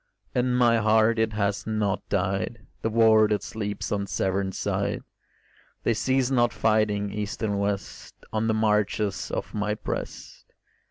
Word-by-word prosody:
In 125 0 +1
my 120 -2 +4
heart 110 +1 +3
it 110 -1 +1
has 100 -1 -1
not 105 -2 0
died, 95 +4 -1 0.2
The 115 - 0
war 110 -1 +5
that 105 -1 0
sleeps 105 -2 -4
on 100 -1 -1
Severn 95 0 -1
side; - - -2 0.8
They 115 - +2
cease 130 +3 +1
not 120 -2 +3
fighting, 105 -2 +1
east 105 +1 -4
and 100 -2 0
west, 100 -1 -3 0.2
On 110 +1 0
the 110 - +2
marches 105 -4 0
of - - -4
my 105 0 -1
breast. 105 - -7
105 Hz, 150 wpm, -26 LUFS, 100-110 Hz, 0.8 s, war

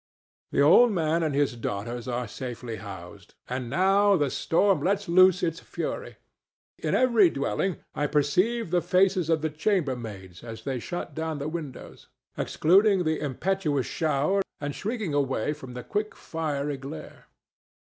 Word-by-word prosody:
The - - +1
old 235 +11 +7
man 165 -3 +1
and 155 -4 0
his 140 -3 +1
daughters 115 +2 -4
are 125 -1 -2
safely 120 -3 -6
housed, 100 0 -10
and 125 -1 -4
now 195 +7 +4
the 145 -6 +1
storm 195 +3 +2
lets 200 +1 0
loose 185 +1 +5
its 165 -1 -1
fury. - - -5 0.6
In - - 0
every 235 -8 +5
dwelling 140 - -1 0.2
I 145 - 0
perceive 180 +9 +1
the 175 -1 +3
faces 180 0 +2
of 160 -2 +1
the 160 - 0
chambermaids 125 - -2
as 115 -1 -8
they 130 -2 -2
shut 175 +9 -5
down 160 -1 -3
the 145 +1 -4
windows, 155 -5 -7 0.3
excluding 190 +3 +3
the 160 -1 0
impetuous 150 0 -1
shower 155 +5 +1 0.2
and 145 0 -3
shrinking 210 - -3
away 140 -1 0
from 130 -5 -10
the 125 - -6
quick 210 - -3
fiery 150 -3 -3
glare. 135 - -9
155 Hz, 150 wpm, -26 LUFS, 130-185 Hz, 0.6 s, old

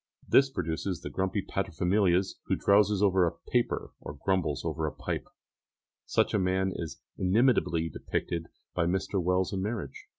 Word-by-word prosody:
This 135 0 +5
produces 85 -3 -3
the - - -6
grumpy 95 +1 -1
paterfamilias 95 0 +1
who - - +1
drowses 100 0 +3
over 95 -2 +4
a 85 - -4
paper 120 -1 0
or 75 - -8
grumbles 85 -5 0
over 80 -1 -1
a - - -2
pipe; - - -4 0.8
such - - +2
a 105 - +3
man 95 +1 +1
is 80 -2 -6 0.2
inimitably 95 -4 +3
depicted 80 +1 -3 0.3
by 85 -1 +1
Mr. 95 +1 0
Wells 90 +2 +1
in 95 - -1
Marriage. 100 - -4
95 Hz, 155 wpm, -29 LUFS, 85-100 Hz, 0.8 s, This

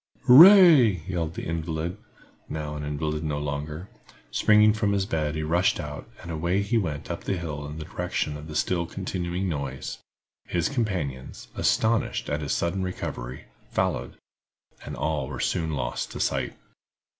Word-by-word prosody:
"Hooray!" 140 - +8
yelled 85 -3 -2
the - - -5
invalid, 85 +1 -3 0.5
now 75 -1 -4
an 75 - -5
invalid 75 +1 -2
no 75 -2 -2
longer. 75 +4 -4 0.4
Springing 105 0 +5
from 105 -2 0
his 100 -1 +1
bed 80 -4 -1
he 80 - -2
rushed 85 +4 +2
out, - - -7
and 85 - -7
away 85 +5 0
he 100 +4 -1
went 80 -10 -1
up - - -5
the 95 - -1
hills 75 -4 -5
in 75 - -7
the 80 - -6
direction 75 - -3
of 75 +1 -8
the 75 - -8
still 85 +2 0
continuing 90 0 -3
noise. 70 -6 -4 0.5
His 85 -1 0
companions, 90 - -3
astonished 110 -7 +1
at 75 +1 -1
his 75 - -3
sudden 85 +3 0
recovery, 65 -9 -5 0.2
followed, - - -1 0.7
and - - -6
all 75 -4 -1
were - - -6
soon 80 -1 -1
lost - - -3
to - - -6
sight. - - -1
80 Hz, 160 wpm, -26 LUFS, 75-95 Hz, 0.7 s, Hooray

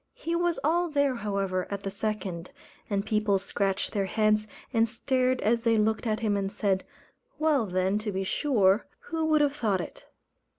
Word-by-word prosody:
He 335 +1 -3
was 345 0 +1
all 340 +4 +2
there, 285 -3 +2
however, 195 -4 -1
at 200 -1 -4
the 195 - -3
second; 195 -4 -3 0.4
and 200 -1 0
people 210 -2 +2
scratched 195 0 -1
their 200 -3 -1
heads, 215 +1 +2 0.3
and 225 -1 +3
stared 255 +2 +1
as 230 +2 +2
they 230 -1 +3
looked 220 +2 +1
at 215 0 0
him 210 -2 +1
and 195 -1 -1
said, 195 -3 0 0.5
"Well, 300 -7 +2
then, 185 +2 +1
to 215 -1 -3
be 190 0 -2
sure, 210 -2 +2 0.3
who 325 0 0
would 310 -1 +4
have 290 -1 +2
thought 215 -9 0
it!" - - -8
215 Hz, 180 wpm, -28 LUFS, 195-255 Hz, 0.5 s, would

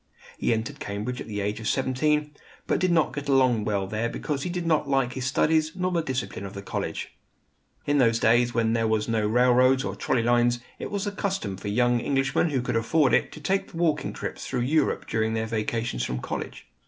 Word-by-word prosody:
He - - +1
entered 115 0 -2
Cambridge 105 +5 -4
at - - -7
the 105 -2 -3
age 105 +2 -2
of 110 - -5
seventeen; 150 +3 +1 0.3
but - - +1
did 185 0 +2
not 160 -3 +2
get 145 -1 -5
along 130 -5 +3
well 100 -3 0
there 110 +4 -2
because 145 +1 -3
he 180 - -3
did 175 -1 -3
not 155 -4 +1
like 135 -3 +1
his 130 -1 -3
studies 155 +3 +2
nor 185 0 -1
the 170 -2 +1
discipline 130 -9 -4
of 100 0 -7
the 100 - -6
college. - - -4 0.7
In 145 0 +2
those 115 -3 +4
days, 120 +2 +3
when 115 -1 +1
there 115 -1 +1
was 110 -1 0
no 110 -2 +1
railroads 125 +3 +4
or - - -3
trolley 125 -3 0
lines, 120 0 +3 0.2
it - - -5
was 200 0 -2
the 205 - -1
custom 195 - -2
for 95 - -8
young 120 +3 +2
Englishmen 135 +5 +1
who 135 -4 -1
could 120 - -2
afford 135 +5 +2
it - - +2
to - - -9
take 190 +4 -1
walking 165 -2 0
trips - - -6
through 125 -2 -1
Europe 145 +4 +1
during 110 0 0
their 110 0 -1
vacations 110 - -2
from 60 0 -2
college. - - -6
125 Hz, 215 wpm, -26 LUFS, 110-150 Hz, 0.7 s, those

